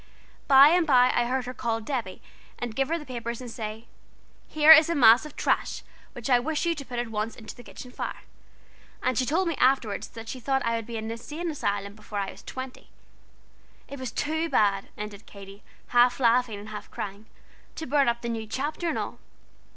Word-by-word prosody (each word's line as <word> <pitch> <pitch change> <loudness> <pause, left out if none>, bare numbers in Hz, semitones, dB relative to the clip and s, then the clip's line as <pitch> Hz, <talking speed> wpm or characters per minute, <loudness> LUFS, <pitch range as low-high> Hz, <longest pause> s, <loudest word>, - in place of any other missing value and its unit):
By 275 +1 +8
and 345 0 +3
by 250 -3 +5
I 240 - +2
heard 255 +1 -1
her 250 - -5
call 230 -2 -2
Debby, 225 -5 -4 0.3
and 240 -2 -5
give 270 +1 +1
her 330 - 0
the 300 - -9
papers, 235 -2 -5
and 250 -2 -8
say: 220 0 -6 0.6
'Here 310 0 +6
is 315 0 +9
a 335 - 0
mass 240 +1 +6
of 300 - -15
trash - - -1 0.3
which 240 -3 -6
I 250 -2 +5
wish 310 +6 -2
you 340 - +2
to 295 -3 -7
put 250 -2 -7
at 240 -1 -2
once 220 +1 -3
into 220 - -10
the 245 - -13
kitchen 250 +1 -11
fire.' - - -6 0.8
And 255 0 +1
she 255 +2 0
told 350 +5 +1
me 335 - 0
afterward 250 -5 +2
that 225 0 -8
she 255 - -6
thought 270 +1 0
I 230 0 +1
would 230 -1 -4
be 235 -1 -5
in 220 - -5
an 225 - -4
insane 305 +9 -5
asylum 200 -8 -2
before 210 0 -8
I 195 -1 -2
was - - -14
twenty. 260 0 -8 1.0
It 280 - -8
was 260 -3 -5
too 315 +2 -1
bad," 200 -5 +2
ended 210 0 -8
Katy 200 0 -12 0.3
half 245 +1 +4
laughing 240 -3 +2
and 205 +1 -9
half 210 -1 -8
crying, 205 +2 -7 0.5
"to 320 - -5
burn 280 -1 +2
up 235 0 -3
the 235 - -2
new 225 -1 -4
chapter 295 +8 -2
and - - -2
all. - - -5
245 Hz, 215 wpm, -26 LUFS, 220-275 Hz, 1.0 s, is